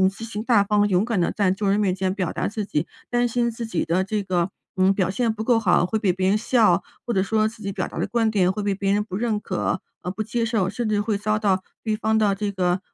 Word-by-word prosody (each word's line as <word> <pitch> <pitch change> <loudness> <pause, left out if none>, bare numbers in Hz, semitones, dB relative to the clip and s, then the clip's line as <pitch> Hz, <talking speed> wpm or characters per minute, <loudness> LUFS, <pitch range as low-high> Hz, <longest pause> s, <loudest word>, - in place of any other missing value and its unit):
积 225 - -9
极、 220 -2 -5
大 230 -4 +4
方、 205 0 +2
勇 190 -1 +2
敢 225 -3 -1
地 170 - +1
在 200 -3 +1
众 195 +1 0
人 200 - +2
面 195 -3 +1
前 190 -1 -1
表 185 -4 -2
达 - - -2
自 215 +1 -3
己 165 -5 -1 0.2
担 245 0 +2
心 235 0 0
自 230 0 -5
己 200 -7 -1
的 180 +3 +1
这 210 +2 -2
个， 185 -1 -1 0.2
嗯， 190 0 +4
表 190 -2 0
现 225 +3 0
不 220 0 -4
够 235 0 +3
好， 180 -5 +3
会 220 - 0
被 200 -4 +1
别 185 +1 +1
人 205 - +3
笑。 215 -5 +3 0.2
或 - - 0
者 190 -4 +2
说 215 +1 +1
自 220 0 -9
己 200 - -2
表 - - -3
达 - - -10
的 - - 0
观 225 +1 +1
点， 190 -4 +2
会 210 - -4
被 200 -1 0
别 195 0 0
人 205 +1 +1
不 190 -3 -7
认 220 -1 0
可 185 -2 -2 0.2
和 180 - -3
不 195 - -5
接 230 +2 -1
受， 220 -5 0
甚 230 +4 -3
至 210 -1 +1
会 210 -1 -1
遭 215 +1 0
到 195 -3 +1 0.2
对 220 -2 0
方 220 0 +1
的 210 -2 +3
这 205 +1 -2
个 180 -1 0
205 Hz, 300 characters per minute, -23 LUFS, 190-220 Hz, 0.2 s, 大